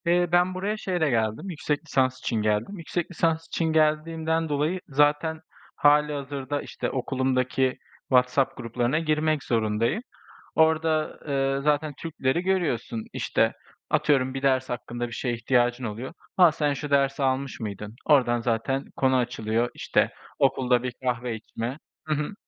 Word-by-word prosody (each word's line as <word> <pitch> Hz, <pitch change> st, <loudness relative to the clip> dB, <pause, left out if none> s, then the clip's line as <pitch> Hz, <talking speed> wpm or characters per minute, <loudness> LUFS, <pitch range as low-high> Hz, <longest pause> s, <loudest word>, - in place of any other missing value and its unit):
Eee, 175 Hz, +1 st, +3 dB
ben 180 Hz, +1 st, +3 dB
buraya 200 Hz, +4 st, -2 dB
şeyle 175 Hz, -7 st, 0 dB
geldim, 110 Hz, -, 0 dB
yüksek 155 Hz, -2 st, -2 dB
lisans 130 Hz, -3 st, +1 dB
için 120 Hz, -, -2 dB
geldim. 105 Hz, -, 0 dB
Yüksek 170 Hz, +1 st, -3 dB
lisans 165 Hz, -1 st, 0 dB
için 165 Hz, -, -1 dB
geldiğimden 160 Hz, +1 st, +1 dB
dolayı 150 Hz, +5 st, 0 dB
zaten 150 Hz, +3 st, +2 dB, 0.3 s
hâlihazırda, 145 Hz, -1 st, +1 dB
işte, -, -, -4 dB
okulumdaki 130 Hz, 0 st, 0 dB, 0.3 s
WhatsApp 125 Hz, +1 st, +3 dB
gruplarına 120 Hz, +5 st, 0 dB
girmek 155 Hz, -2 st, +1 dB
zorundayım. 115 Hz, -, 0 dB, 0.5 s
Orada, 160 Hz, -1 st, +2 dB
eee, 135 Hz, -1 st, +1 dB
zaten 150 Hz, 0 st, +1 dB
Türkleri 160 Hz, -1 st, -1 dB
görüyorsun. 160 Hz, -12 st, -1 dB
İşte, -, -, +1 dB, 0.4 s
atıyorum 130 Hz, -3 st, +2 dB
bir 135 Hz, -, -4 dB
ders 130 Hz, -1 st, +2 dB
hakkında 120 Hz, 0 st, -4 dB
bir -, -, -11 dB
şeye 120 Hz, 0 st, -2 dB
ihtiyacın 120 Hz, +1 st, +1 dB
oluyor: 115 Hz, +5 st, -5 dB, 0.2 s
"Ha, 180 Hz, -4 st, +7 dB
sen 150 Hz, -1 st, 0 dB
şu 145 Hz, +2 st, -5 dB
dersi 140 Hz, 0 st, +2 dB
almış 135 Hz, 0 st, -1 dB
mıydın?" 105 Hz, 0 st, -6 dB
Ordan 120 Hz, -5 st, +4 dB
zaten 120 Hz, +4 st, -1 dB
konu 130 Hz, -1 st, +3 dB
açılıyor, 120 Hz, -1 st, 0 dB
işte, -, -, +1 dB, 0.3 s
okulda 125 Hz, -2 st, +3 dB
bir 125 Hz, -1 st, -3 dB
kahve 120 Hz, -2 st, -1 dB
içme. 115 Hz, +4 st, -5 dB, 0.3 s
Hı 155 Hz, -, 0 dB
hı. 150 Hz, +6 st, -3 dB
135 Hz, 140 wpm, -26 LUFS, 125-155 Hz, 0.5 s, Ha